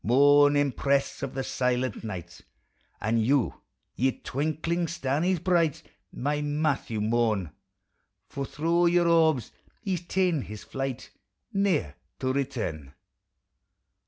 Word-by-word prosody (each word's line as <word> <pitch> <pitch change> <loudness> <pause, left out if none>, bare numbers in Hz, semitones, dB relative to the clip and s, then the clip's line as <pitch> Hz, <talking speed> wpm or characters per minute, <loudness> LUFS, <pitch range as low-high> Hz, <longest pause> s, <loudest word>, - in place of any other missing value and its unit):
Mourn, 145 +4 +5
empress 140 0 +1
of 140 -3 -4
the 135 - -1
silent 125 -2 -1
night! 90 -5 -7 0.6
And 110 +1 +1
you, 130 +1 +1 0.3
ye 130 +2 +2
twinkling 160 +5 -1
starnies 170 +3 0
bright, 170 -3 +1 0.3
My 145 +3 -1
Matthew 145 -6 -1
mourn! 110 -6 +1 0.8
For 140 - -5
thro' 170 +5 +1
your 175 0 +3
orbs 160 -7 +3 0.3
he 190 -2 0
's - - -8
ta'en 180 -6 +1
his 105 -3 -9
tlight, 135 -2 -4 0.4
Ne'er 190 - +1 0.2
to 130 0 -1
return. 110 - -3
140 Hz, 115 wpm, -27 LUFS, 120-160 Hz, 0.8 s, Mourn